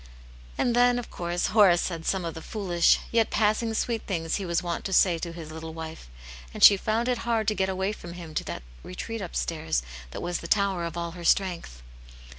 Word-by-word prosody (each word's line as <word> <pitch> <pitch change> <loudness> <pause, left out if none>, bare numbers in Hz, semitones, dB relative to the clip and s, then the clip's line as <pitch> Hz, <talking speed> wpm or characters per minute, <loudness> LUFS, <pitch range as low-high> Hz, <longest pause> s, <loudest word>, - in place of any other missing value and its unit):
And 240 -1 +1
then, 245 0 +4
of 245 - -6
course, 175 0 -2
Horace 195 -6 +6
said 165 -2 -4
some 190 -3 0
of 165 - -3
the 160 - -8
foolish, 175 -3 +2
yet 230 -1 +3
passing 215 +2 +1
sweet 230 0 -1
things 165 -4 -1
he 195 -3 -4
was 170 +1 0
wont 170 -1 -3
to 190 - -2
say 175 -3 +4
to 170 0 -4
his 165 -2 -9
little 160 0 -7
wife, 160 - -8 0.5
and - - -2
she 205 - +11
found 220 +4 -1
it 250 -2 0
hard 225 -3 0
to - - 0
get 190 -2 0
away 190 +1 -1
from 175 -5 -9
him 170 -3 -9
to - - -1
that - - -6 0.2
retreat 225 +4 -6
upstairs 155 - -2 0.3
that - - -7
was 175 0 -2
the 170 - -7
tower 195 -3 +1
of 170 0 -5
all 170 0 -3
her 175 0 -9
strength. 170 - 0
180 Hz, 220 wpm, -27 LUFS, 170-210 Hz, 0.5 s, she